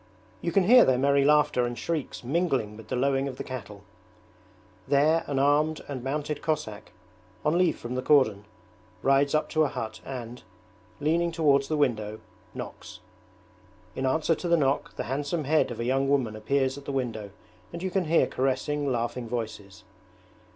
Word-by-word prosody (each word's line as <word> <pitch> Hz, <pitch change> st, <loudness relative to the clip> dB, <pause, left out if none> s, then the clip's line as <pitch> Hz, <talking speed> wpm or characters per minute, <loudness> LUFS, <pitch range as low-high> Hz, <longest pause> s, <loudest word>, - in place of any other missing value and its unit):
You 170 Hz, -, -1 dB
can 195 Hz, +3 st, +3 dB
hear 245 Hz, +5 st, +8 dB
their 130 Hz, -, +3 dB
merry 140 Hz, +1 st, +3 dB
laughter 150 Hz, -3 st, +3 dB
and 120 Hz, 0 st, -3 dB
shrieks 160 Hz, -7 st, -3 dB
mingling 135 Hz, -7 st, 0 dB
with 110 Hz, 0 st, -12 dB
the -, -, -2 dB
lowing 135 Hz, +1 st, +1 dB
of 130 Hz, -2 st, -6 dB
the -, -, -4 dB
cattle. 105 Hz, -6 st, -8 dB, 1.0 s
There 150 Hz, +4 st, +3 dB
an 140 Hz, -, -2 dB
armed 145 Hz, +3 st, +2 dB
and 135 Hz, -4 st, -5 dB
mounted 145 Hz, +2 st, -3 dB
Cossack, 150 Hz, -10 st, -3 dB, 0.5 s
on 150 Hz, -, +2 dB
leave 180 Hz, -1 st, +2 dB
from 120 Hz, +1 st, -6 dB
the 130 Hz, -, -1 dB
cordon, 125 Hz, -8 st, +3 dB, 0.6 s
rides 140 Hz, +2 st, +3 dB
up 155 Hz, -, +1 dB
to 155 Hz, -, +1 dB
a -, -, +2 dB
hut 110 Hz, -6 st, -6 dB
and, 125 Hz, -2 st, -7 dB, 0.6 s
leaning 170 Hz, +3 st, +1 dB
towards 145 Hz, -4 st, +2 dB
the 155 Hz, -, -1 dB
window, 110 Hz, -6 st, 0 dB, 0.4 s
knocks. -, -, -8 dB, 0.9 s
In 130 Hz, -, -1 dB
answer 160 Hz, +5 st, +2 dB
to 175 Hz, -, -4 dB
the 170 Hz, 0 st, +4 dB
knock 140 Hz, -2 st, 0 dB
the -, -, -3 dB
handsome 145 Hz, +6 st, -2 dB
head 155 Hz, +3 st, +2 dB
of 120 Hz, -, -7 dB
a 115 Hz, -, -2 dB
young 135 Hz, +2 st, +1 dB
woman 130 Hz, -6 st, +1 dB
appears 130 Hz, +5 st, 0 dB
at 140 Hz, -, -16 dB
the -, -, -4 dB
window 115 Hz, -6 st, -3 dB, 0.4 s
and 170 Hz, +1 st, -7 dB
you 190 Hz, -, -2 dB
can 190 Hz, -1 st, 0 dB
hear 165 Hz, +2 st, +4 dB
caressing, 135 Hz, +2 st, -1 dB
laughing 120 Hz, 0 st, -2 dB
voices. 110 Hz, -3 st, -5 dB
135 Hz, 175 wpm, -27 LUFS, 120-150 Hz, 1.0 s, hear